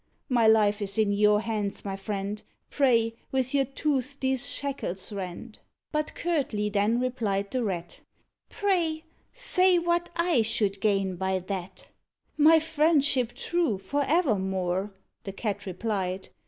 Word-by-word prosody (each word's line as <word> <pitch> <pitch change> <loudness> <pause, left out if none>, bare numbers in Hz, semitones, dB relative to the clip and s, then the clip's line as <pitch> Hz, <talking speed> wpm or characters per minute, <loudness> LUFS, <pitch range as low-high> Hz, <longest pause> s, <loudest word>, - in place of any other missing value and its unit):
My 235 -3 +3
life 210 -1 +4
is 195 0 -2
in 215 -2 +3
your 210 +1 +4
hands, 210 -3 -3
my 195 -1 -3
friend; 200 +1 -4 0.3
Pray, 230 -5 +3 0.2
with 260 -1 -1
your 275 -1 +3
tooth 275 0 -2
these, 265 +1 0
shackles 270 -10 -3
rend." 195 +4 -7 0.3
But 305 0 -2
curtly 265 -12 -1
then 210 +3 +1
replied 215 -6 -1
the 255 -2 -1
Rat, 175 -5 -4 0.5
"Pray, 340 -6 0 0.3
say 375 -8 +4
what 345 0 0
I 340 -6 +2
should 210 -3 0
gain 195 -3 +1
by 190 +1 0
that?" 185 0 -6 0.5
"My 315 +2 +6
friendship 295 -6 +2
true, 330 - 0
for 285 +10 -1
evermore," 190 - 0 0.3
The 195 - -6
Cat 205 -1 -4
replied. 190 -1 -3
225 Hz, 135 wpm, -27 LUFS, 195-285 Hz, 0.5 s, My